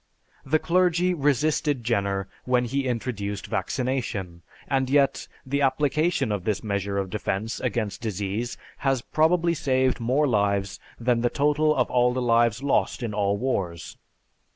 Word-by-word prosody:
The 150 Hz, +4 st, +2 dB
clergy 180 Hz, +1 st, +2 dB
resisted 145 Hz, -2 st, +1 dB
Jenner 100 Hz, -4 st, 0 dB, 0.2 s
when 125 Hz, -1 st, +2 dB
he 135 Hz, +3 st, -1 dB
introduced 110 Hz, -5 st, -3 dB
vaccination, 110 Hz, -6 st, -2 dB, 0.3 s
and 135 Hz, -1 st, 0 dB
yet 140 Hz, -1 st, +2 dB, 0.2 s
the 140 Hz, +2 st, -1 dB
application 145 Hz, 0 st, +1 dB
of 100 Hz, -3 st, -2 dB
this 105 Hz, +1 st, -1 dB
measure 100 Hz, -1 st, -2 dB
of 95 Hz, -2 st, -2 dB
defense 105 Hz, +1 st, -2 dB
against 110 Hz, -3 st, -2 dB
disease 105 Hz, +2 st, -3 dB, 0.2 s
has 135 Hz, -3 st, 0 dB
probably 170 Hz, +2 st, +2 dB
saved 130 Hz, -4 st, +1 dB
more 130 Hz, +6 st, +2 dB
lives 100 Hz, -5 st, 0 dB, 0.2 s
than 120 Hz, 0 st, +1 dB
the 120 Hz, -, +2 dB
total 150 Hz, +2 st, +2 dB
of 125 Hz, -, +2 dB
all 125 Hz, 0 st, +3 dB
the 130 Hz, -, -1 dB
lives 115 Hz, 0 st, +2 dB
lost 140 Hz, -2 st, +1 dB
in 110 Hz, -3 st, -3 dB
all 100 Hz, -1 st, +1 dB
wars. 95 Hz, -9 st, -3 dB
125 Hz, 145 wpm, -25 LUFS, 105-140 Hz, 0.3 s, all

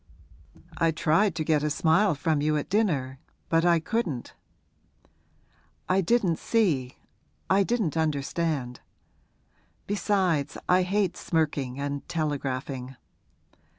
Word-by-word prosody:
'I 165 Hz, -1 st, +3 dB
tried 165 Hz, +4 st, +2 dB
to 160 Hz, -, -1 dB
get 155 Hz, -2 st, +2 dB
a 150 Hz, -, 0 dB
smile 170 Hz, +4 st, +3 dB
from 155 Hz, 0 st, 0 dB
you 150 Hz, +1 st, +1 dB
at 145 Hz, -, -5 dB
dinner 145 Hz, -12 st, 0 dB, 0.3 s
but 165 Hz, 0 st, +3 dB
I 170 Hz, -1 st, +4 dB
couldn't.' 165 Hz, -, -3 dB, 1.5 s
'I 190 Hz, +1 st, +3 dB
didn't 190 Hz, -4 st, +1 dB
see 155 Hz, -, 0 dB, 0.5 s
I 195 Hz, +1 st, +5 dB
didn't 205 Hz, -6 st, 0 dB
understand. 150 Hz, -4 st, -1 dB, 1.1 s
Besides, 190 Hz, -8 st, 0 dB
I 180 Hz, +1 st, +4 dB
hate 190 Hz, 0 st, 0 dB
smirking 145 Hz, -5 st, -1 dB
and 140 Hz, 0 st, -4 dB
telegraphing. 135 Hz, -4 st, -3 dB
160 Hz, 110 wpm, -27 LUFS, 140-185 Hz, 1.5 s, I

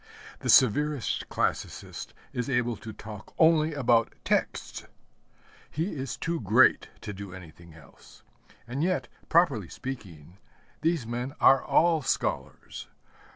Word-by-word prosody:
The -, -, -4 dB
severest 140 Hz, +2 st, +3 dB
classicist -, -, -3 dB, 0.2 s
is 125 Hz, +1 st, -3 dB
able 120 Hz, -2 st, 0 dB
to 110 Hz, +1 st, -9 dB
talk 105 Hz, -1 st, -11 dB
only 160 Hz, -1 st, +4 dB
about 120 Hz, -4 st, +2 dB
texts. -, -, -2 dB, 0.8 s
He 165 Hz, +6 st, -3 dB
is 135 Hz, -3 st, -5 dB
too 165 Hz, 0 st, -2 dB
great 115 Hz, +4 st, +4 dB
to 105 Hz, -, -6 dB
do 95 Hz, -2 st, -8 dB
anything 85 Hz, -2 st, -13 dB
else. 80 Hz, -3 st, -18 dB, 0.4 s
And 130 Hz, +5 st, -2 dB
yet, 185 Hz, +1 st, 0 dB, 0.2 s
properly 140 Hz, -, +3 dB
speaking, 95 Hz, -, -8 dB, 0.4 s
these 160 Hz, -5 st, 0 dB
men 120 Hz, +4 st, -4 dB
are 135 Hz, -1 st, +6 dB
all 165 Hz, -1 st, +3 dB
scholars. -, -, -3 dB
125 Hz, 120 wpm, -27 LUFS, 105-150 Hz, 0.8 s, are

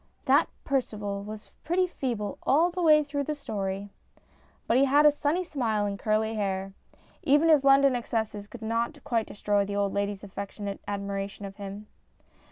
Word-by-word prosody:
That -, -, +4 dB
Percival 210 Hz, -7 st, -2 dB
was 210 Hz, +1 st, -9 dB
pretty 360 Hz, +3 st, +2 dB
feeble 235 Hz, -, -3 dB
all 325 Hz, +6 st, +3 dB
the 360 Hz, +1 st, -3 dB
way 305 Hz, -2 st, +6 dB
through 285 Hz, -1 st, -3 dB
the 305 Hz, -, -2 dB
story. 200 Hz, -7 st, -4 dB, 0.7 s
But 235 Hz, -, +3 dB
he 275 Hz, -, +5 dB
had 290 Hz, +2 st, +4 dB
a 300 Hz, -, +8 dB
sunny 295 Hz, +5 st, 0 dB
smile 235 Hz, -11 st, -1 dB
and 200 Hz, -1 st, -3 dB
curly 220 Hz, +1 st, +1 dB
hair. 195 Hz, -2 st, -2 dB, 0.5 s
Even 295 Hz, +4 st, +4 dB
his 300 Hz, -4 st, +6 dB
London 275 Hz, -1 st, +5 dB
excesses 220 Hz, -3 st, -3 dB
could 230 Hz, +1 st, -10 dB
not 235 Hz, +6 st, -2 dB
quite 230 Hz, -2 st, 0 dB
destroy 205 Hz, -1 st, 0 dB
the 200 Hz, 0 st, -4 dB
old 200 Hz, -1 st, 0 dB
ladies' 200 Hz, 0 st, -2 dB
affectionate 200 Hz, 0 st, -6 dB
admiration 200 Hz, 0 st, -4 dB
for -, -, -24 dB
him. 200 Hz, +1 st, -7 dB
220 Hz, 170 wpm, -28 LUFS, 200-280 Hz, 0.7 s, a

